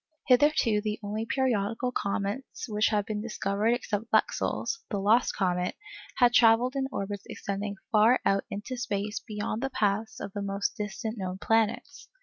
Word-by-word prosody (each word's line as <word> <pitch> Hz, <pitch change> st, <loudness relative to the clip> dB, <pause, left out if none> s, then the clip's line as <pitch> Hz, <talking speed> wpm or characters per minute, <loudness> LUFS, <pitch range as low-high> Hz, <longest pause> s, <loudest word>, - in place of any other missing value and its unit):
Hitherto 250 Hz, -5 st, +4 dB
the 210 Hz, 0 st, -2 dB
only 215 Hz, +2 st, -3 dB
periodical 245 Hz, -2 st, 0 dB
comets 200 Hz, +3 st, -3 dB
which 210 Hz, -1 st, +2 dB
had 210 Hz, -2 st, +1 dB
been 210 Hz, 0 st, -3 dB
discovered 215 Hz, 0 st, 0 dB
except 225 Hz, -2 st, -4 dB
Lexell's—the 455 Hz, -, 0 dB
'lost 215 Hz, +5 st, +3 dB
comet'—had 240 Hz, -, 0 dB
travelled 240 Hz, +2 st, +5 dB
in 270 Hz, -1 st, 0 dB
orbits 200 Hz, -2 st, -4 dB
extending 200 Hz, +1 st, -4 dB, 0.2 s
far 220 Hz, +3 st, +5 dB
out 195 Hz, 0 st, +2 dB
into 210 Hz, +6 st, -5 dB
space 205 Hz, -3 st, -2 dB
beyond 210 Hz, +2 st, -4 dB
the 270 Hz, -, -1 dB
paths 215 Hz, -3 st, -1 dB
of 195 Hz, -, -6 dB
the 205 Hz, -, -3 dB
most 200 Hz, 0 st, -2 dB
distant 210 Hz, +2 st, -4 dB
known 185 Hz, -1 st, -3 dB
planets. 225 Hz, +1 st, 0 dB
215 Hz, 145 wpm, -28 LUFS, 200-240 Hz, 0.2 s, travelled